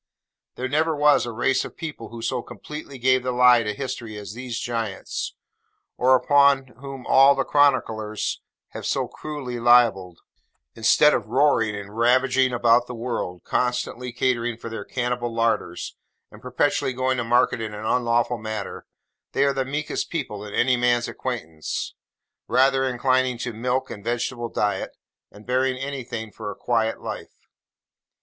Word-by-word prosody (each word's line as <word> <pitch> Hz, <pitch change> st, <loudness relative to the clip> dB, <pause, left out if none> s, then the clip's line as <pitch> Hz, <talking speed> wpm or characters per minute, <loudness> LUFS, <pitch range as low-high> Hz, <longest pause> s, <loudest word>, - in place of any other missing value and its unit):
There 130 Hz, -, -3 dB
never 155 Hz, +4 st, +1 dB
was 145 Hz, -3 st, +4 dB
a -, -, -3 dB
race 130 Hz, +4 st, +1 dB
of -, -, -10 dB
people 150 Hz, -8 st, -6 dB
who 115 Hz, 0 st, -8 dB
so 125 Hz, +1 st, -1 dB
completely 150 Hz, +2 st, -9 dB
gave 130 Hz, +1 st, +3 dB
the 125 Hz, 0 st, -2 dB
lie 125 Hz, -1 st, +6 dB
to 105 Hz, -2 st, -2 dB
history 115 Hz, -2 st, -5 dB
as 105 Hz, 0 st, -7 dB
these 120 Hz, 0 st, -5 dB
giants, 115 Hz, -5 st, -4 dB, 0.6 s
or 130 Hz, +1 st, +5 dB, 0.6 s
whom 135 Hz, -1 st, -8 dB
all 135 Hz, +1 st, +6 dB
the 135 Hz, -, +1 dB
chroniclers 115 Hz, -8 st, +1 dB, 0.3 s
have -, -, -6 dB
so -, -, 0 dB
cruelly 135 Hz, -6 st, -6 dB
libelled. 115 Hz, -7 st, +4 dB, 0.5 s
Instead 130 Hz, +6 st, +4 dB
of -, -, -1 dB
roaring 115 Hz, -4 st, +2 dB
and 100 Hz, 0 st, -8 dB
ravaging 130 Hz, +2 st, +3 dB
about 120 Hz, 0 st, +3 dB
the 125 Hz, -, -6 dB
world, 115 Hz, -7 st, -4 dB
constantly 125 Hz, 0 st, -1 dB
catering 120 Hz, -2 st, 0 dB
for 115 Hz, 0 st, -8 dB
their 110 Hz, -2 st, -5 dB
cannibal 120 Hz, +1 st, -2 dB
larders, 115 Hz, -6 st, -1 dB, 0.4 s
and -, -, -14 dB
perpetually 130 Hz, -, 0 dB
going 130 Hz, +1 st, 0 dB
to 120 Hz, -, -1 dB
market 120 Hz, 0 st, +2 dB
in 110 Hz, -1 st, -5 dB
an 105 Hz, +1 st, -7 dB
unlawful 120 Hz, 0 st, +1 dB
manner, 110 Hz, -2 st, -6 dB, 0.5 s
they 135 Hz, -, +2 dB
are 140 Hz, 0 st, +3 dB
the 135 Hz, -1 st, -1 dB
meekest 145 Hz, +3 st, -3 dB
people 125 Hz, -11 st, -4 dB
in 105 Hz, -, -8 dB
any 125 Hz, +1 st, +3 dB
man's 120 Hz, 0 st, +2 dB
acquaintance: 80 Hz, -12 st, -4 dB, 0.5 s
rather 135 Hz, +2 st, +3 dB
inclining 130 Hz, 0 st, +1 dB
to 120 Hz, 0 st, -4 dB
milk 125 Hz, +4 st, -2 dB
and 100 Hz, -, -8 dB
vegetable 120 Hz, 0 st, -2 dB
diet, 105 Hz, -2 st, -2 dB, 0.3 s
and 105 Hz, +1 st, -15 dB
bearing 130 Hz, +1 st, +1 dB
anything 125 Hz, -5 st, -5 dB
for 105 Hz, -1 st, -7 dB
a -, -, -6 dB
quiet 115 Hz, -2 st, 0 dB
life. -, -, -8 dB
120 Hz, 155 wpm, -24 LUFS, 115-130 Hz, 0.6 s, lie